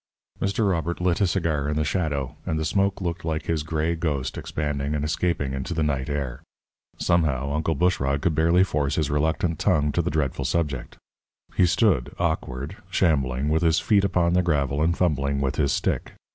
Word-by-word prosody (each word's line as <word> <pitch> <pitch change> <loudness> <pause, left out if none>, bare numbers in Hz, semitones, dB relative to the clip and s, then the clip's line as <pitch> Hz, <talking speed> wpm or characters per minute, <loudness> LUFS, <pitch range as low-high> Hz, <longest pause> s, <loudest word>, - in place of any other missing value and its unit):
Mr. 100 +2 +1
Robert 85 0 -2
lit 90 +1 +1
a 100 - +4
cigar 80 -6 0
in 75 - -1
the 75 - +1
shadow, 75 -7 -1
and 80 - -2
the 80 - -1
smoke 100 +2 +1
looked 85 -1 -3
like 80 -1 -2
his 80 -2 0
gray 80 +1 -1
ghost 75 -6 -2
expanding 75 -1 -2
and 75 0 -1
escaping 80 -3 -1
into 65 +5 -3
the 80 - +1
night 70 -2 -1
air. 70 -4 -3 0.6
Somehow, 75 -6 +1
Uncle 80 +1 0
Bushrod 70 -4 +1
could 85 - +2
barely 85 +4 +4
force 75 -6 0
his 75 -3 0
reluctant 80 +2 0
tongue 75 0 +2
to - - +1
the - - -1
dreadful 70 -3 -1
subject. 75 -3 -2 0.6
He 90 - +4
stood, 90 - +2
awkward, 75 -5 -2
shambling, 70 -5 +1
with 80 +2 +2
his 80 -2 +3
feet 100 -3 +3
upon 90 -3 +2
the 90 - +4
gravel 75 -4 0
and 85 +2 +2
fumbling 70 -5 +1
with 70 +1 -1
his 70 -3 +2
stick. - - -1
80 Hz, 185 wpm, -25 LUFS, 70-85 Hz, 0.6 s, a